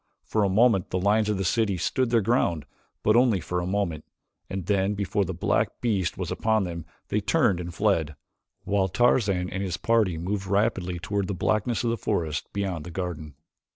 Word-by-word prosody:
For 110 Hz, -, 0 dB
a 100 Hz, -, +2 dB
moment 105 Hz, -1 st, +3 dB
the 95 Hz, -, -1 dB
lions 105 Hz, +3 st, +2 dB
of 105 Hz, -, 0 dB
the 95 Hz, -, -1 dB
city 100 Hz, +1 st, +1 dB
stood 125 Hz, +8 st, 0 dB
their 115 Hz, -1 st, +3 dB
ground, 90 Hz, -, +1 dB, 0.4 s
but 105 Hz, -, +4 dB
only 120 Hz, -5 st, +4 dB
for 90 Hz, +2 st, -3 dB
a 90 Hz, -, -3 dB
moment, 90 Hz, -6 st, -1 dB, 0.5 s
and 95 Hz, -2 st, -4 dB
then 100 Hz, +1 st, +1 dB
before 100 Hz, 0 st, 0 dB
the 90 Hz, -, -4 dB
black 85 Hz, -, 0 dB
beast 100 Hz, -7 st, 0 dB
was -, -, -4 dB
upon 110 Hz, -2 st, +1 dB
them, 85 Hz, -3 st, -5 dB, 0.2 s
they -, -, 0 dB
turned 90 Hz, -3 st, +2 dB
and 90 Hz, 0 st, -5 dB
fled, 85 Hz, -6 st, 0 dB, 0.5 s
while 100 Hz, -1 st, +1 dB
Tarzan 100 Hz, -3 st, +2 dB
and 95 Hz, +1 st, -3 dB
his 90 Hz, -3 st, -2 dB
party 110 Hz, -7 st, +2 dB
moved 95 Hz, +3 st, -3 dB
rapidly 95 Hz, -3 st, 0 dB
toward 95 Hz, +3 st, -2 dB
the 100 Hz, -, -3 dB
blackness 110 Hz, +6 st, 0 dB
of 115 Hz, -, +1 dB
the 115 Hz, -, -1 dB
forest 80 Hz, -6 st, -2 dB
beyond 95 Hz, -6 st, -3 dB
the 85 Hz, -, -8 dB
garden. 80 Hz, -5 st, -5 dB
95 Hz, 195 wpm, -26 LUFS, 90-105 Hz, 0.5 s, but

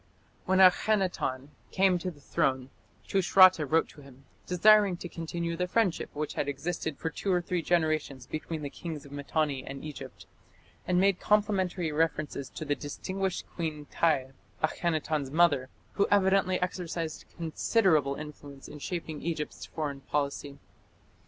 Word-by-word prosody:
When 190 Hz, -, +3 dB
Akhenaton 185 Hz, -8 st, +3 dB, 0.2 s
came 190 Hz, -2 st, +3 dB
to 185 Hz, -, -3 dB
the 155 Hz, -5 st, -12 dB
throne 130 Hz, -1 st, -1 dB, 0.4 s
Tushratta 185 Hz, -4 st, +5 dB
wrote 160 Hz, +3 st, +3 dB
to 150 Hz, -, -14 dB
him, 135 Hz, -1 st, -16 dB, 0.2 s
desiring 200 Hz, +1 st, +5 dB
to 175 Hz, -, -6 dB
continue 170 Hz, 0 st, -4 dB
the 180 Hz, +2 st, -1 dB
friendship 195 Hz, -2 st, +1 dB
which 150 Hz, 0 st, -3 dB
had 145 Hz, -, -2 dB
existed 160 Hz, +2 st, -3 dB
for 160 Hz, -, -3 dB
two 195 Hz, +5 st, -2 dB
or 180 Hz, -, +3 dB
three 175 Hz, 0 st, -2 dB
generations 155 Hz, -6 st, 0 dB
between 155 Hz, +1 st, -5 dB
the 140 Hz, -, -4 dB
kings 160 Hz, -4 st, -7 dB
of 140 Hz, -, -13 dB
Mitanni 145 Hz, -1 st, -1 dB
and 135 Hz, 0 st, -8 dB
Egypt, 150 Hz, -2 st, -9 dB, 0.6 s
and 180 Hz, 0 st, +3 dB
made 195 Hz, -1 st, +3 dB
complimentary 195 Hz, -5 st, +1 dB
references 150 Hz, -3 st, -1 dB
to 155 Hz, -, -7 dB
"the 145 Hz, -, +1 dB
distinguished 185 Hz, +7 st, -4 dB
Queen 155 Hz, -3 st, -4 dB
Tiy", 140 Hz, -6 st, +1 dB, 0.3 s
Akhenaton's 155 Hz, -3 st, 0 dB
mother, 145 Hz, -4 st, +3 dB, 0.2 s
who 200 Hz, -, +2 dB
evidently 190 Hz, -2 st, +3 dB
exercised 170 Hz, -3 st, -4 dB
considerable 160 Hz, -, +2 dB
influence 145 Hz, -2 st, -10 dB
in 150 Hz, -, -10 dB
shaping 160 Hz, -1 st, -5 dB
Egypt's 155 Hz, -3 st, -4 dB
foreign 145 Hz, -3 st, -4 dB
policy. 140 Hz, 0 st, -3 dB
160 Hz, 145 wpm, -29 LUFS, 145-180 Hz, 0.6 s, Tushratta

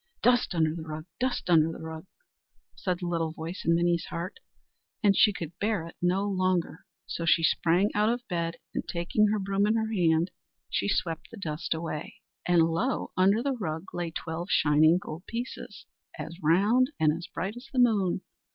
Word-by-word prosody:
"Dust 245 Hz, -6 st, +3 dB
under 160 Hz, -2 st, +2 dB
the 165 Hz, -, -6 dB
rug! 155 Hz, 0 st, -6 dB
dust 255 Hz, 0 st, -1 dB
under 165 Hz, -2 st, +4 dB
the -, -, -7 dB
rug!" 160 Hz, +2 st, -8 dB, 0.7 s
said 180 Hz, -3 st, -1 dB
the 180 Hz, -, -4 dB
little 165 Hz, -2 st, -1 dB
voice 165 Hz, +3 st, -6 dB
in 165 Hz, -, +3 dB
Minnie's 170 Hz, 0 st, +1 dB
heart, 170 Hz, -, -5 dB, 0.6 s
and 200 Hz, -1 st, +5 dB
she 210 Hz, -, +6 dB
could 170 Hz, -4 st, -6 dB
bear 210 Hz, -5 st, 0 dB
it 165 Hz, -, -11 dB
no 185 Hz, +3 st, +1 dB
longer. 185 Hz, -3 st, -1 dB, 0.2 s
So 170 Hz, -, -4 dB
she 165 Hz, 0 st, +4 dB
sprang 175 Hz, +5 st, +3 dB
out 210 Hz, +1 st, +3 dB
of 245 Hz, +1 st, -2 dB
bed, 170 Hz, -2 st, -2 dB, 0.2 s
and, -, -, -2 dB
taking 175 Hz, +5 st, +1 dB
her 215 Hz, +1 st, +1 dB
broom 195 Hz, +1 st, +1 dB
in 215 Hz, -, +2 dB
her 220 Hz, 0 st, -1 dB
hand, 170 Hz, -2 st, +2 dB, 0.4 s
she -, -, 0 dB
swept 165 Hz, -4 st, -1 dB
the 230 Hz, -, -11 dB
dust 160 Hz, -4 st, -3 dB
away; 160 Hz, -2 st, -5 dB, 0.3 s
and 175 Hz, -2 st, +5 dB
lo! 165 Hz, +11 st, 0 dB
under 200 Hz, +5 st, +3 dB
the 280 Hz, 0 st, 0 dB
rug 165 Hz, -7 st, -5 dB
lay 175 Hz, -1 st, -2 dB
twelve 165 Hz, +1 st, -5 dB
shining 155 Hz, +1 st, +5 dB
gold 180 Hz, -2 st, -8 dB
pieces, 240 Hz, +2 st, -6 dB, 0.3 s
as 165 Hz, -, -6 dB
round 205 Hz, -, +4 dB
and 155 Hz, -1 st, +4 dB
as 170 Hz, +1 st, -7 dB
bright 200 Hz, +4 st, -4 dB
as 245 Hz, +2 st, -10 dB
the 265 Hz, -, -6 dB
moon. 205 Hz, -7 st, +3 dB
175 Hz, 190 wpm, -28 LUFS, 165-205 Hz, 0.7 s, she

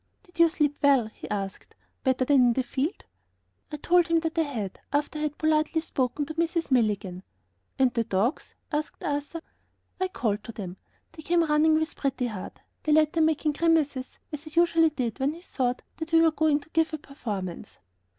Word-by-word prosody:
"Did 355 Hz, -3 st, -19 dB
you 335 Hz, 0 st, +7 dB
sleep 295 Hz, -2 st, 0 dB
well?" 275 Hz, -6 st, +4 dB
he -, -, -10 dB
asked, 195 Hz, -2 st, -5 dB, 0.3 s
"better 260 Hz, -1 st, +2 dB
than 285 Hz, +1 st, +4 dB
in 245 Hz, -1 st, +5 dB
the 260 Hz, -, 0 dB
field?" 270 Hz, +7 st, -3 dB, 0.7 s
I 300 Hz, -, -4 dB
told 350 Hz, +3 st, +3 dB
him 330 Hz, -1 st, +2 dB
that 325 Hz, -1 st, -3 dB
I 330 Hz, -, +3 dB
had, 230 Hz, -, -4 dB
after 290 Hz, +1 st, -1 dB
I -, -, -4 dB
had 300 Hz, -1 st, -2 dB
politely 310 Hz, +1 st, +2 dB
spoken 280 Hz, -2 st, -1 dB
to 315 Hz, -, -6 dB
Mrs. 330 Hz, -1 st, -1 dB
Milligan. 210 Hz, -7 st, +1 dB, 0.6 s
"And 260 Hz, -2 st, +3 dB
the 230 Hz, -, +1 dB
dogs?" 225 Hz, -, -1 dB, 0.2 s
asked 300 Hz, 0 st, -3 dB
Arthur. 290 Hz, +3 st, -3 dB, 0.6 s
I 375 Hz, -, +1 dB
called 215 Hz, -, -2 dB
to 230 Hz, -, -7 dB
them; 190 Hz, -4 st, -7 dB, 0.3 s
they 325 Hz, -, -11 dB
came 340 Hz, +2 st, +2 dB
running 310 Hz, 0 st, +3 dB
up 315 Hz, -, +2 dB
with 315 Hz, -, -3 dB
Pretty 270 Hz, -2 st, -1 dB
Heart; 215 Hz, -6 st, -6 dB, 0.2 s
the 305 Hz, -, +1 dB
latter 310 Hz, +1 st, +3 dB
making 315 Hz, -1 st, +2 dB
grimaces 295 Hz, -4 st, +1 dB
as 300 Hz, 0 st, -6 dB
he 310 Hz, +2 st, 0 dB
usually 330 Hz, -1 st, +4 dB
did 255 Hz, -5 st, -3 dB
when 275 Hz, +3 st, +1 dB
he 335 Hz, -, -12 dB
thought 255 Hz, -8 st, -2 dB
that 325 Hz, 0 st, -6 dB
we 325 Hz, -, +7 dB
were 325 Hz, -1 st, +5 dB
going 310 Hz, -1 st, +2 dB
to 285 Hz, -, -18 dB
give 325 Hz, 0 st, +1 dB
a -, -, -5 dB
performance. 210 Hz, -, -6 dB
295 Hz, 200 wpm, -27 LUFS, 250-320 Hz, 0.7 s, you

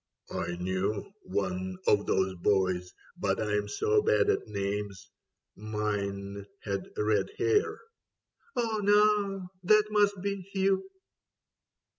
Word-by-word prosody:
" -, -, -23 dB, 0.2 s
I 85 Hz, -, -3 dB
knew 95 Hz, -, -2 dB
One 95 Hz, -1 st, -2 dB
of 105 Hz, 0 st, +3 dB
those 95 Hz, 0 st, +2 dB
boys, 90 Hz, -1 st, +1 dB, 0.3 s
but 95 Hz, -1 st, 0 dB
I'm 105 Hz, -1 st, 0 dB
so 430 Hz, -, +2 dB
bad 430 Hz, -1 st, +3 dB
at -, -, -2 dB
names. 100 Hz, -1 st, -4 dB, 0.4 s
Mine 100 Hz, -2 st, -3 dB, 0.2 s
had 100 Hz, -2 st, -3 dB
red 105 Hz, 0 st, +1 dB
hair." 425 Hz, 0 st, +2 dB, 0.4 s
" 470 Hz, 0 st, -37 dB
Oh, 225 Hz, -3 st, 0 dB
now, 205 Hz, -2 st, +3 dB
that 215 Hz, +3 st, +4 dB
must 205 Hz, -2 st, +3 dB
be 200 Hz, -1 st, -2 dB
Hugh." 195 Hz, -, +1 dB
105 Hz, 120 wpm, -29 LUFS, -, 0.4 s, that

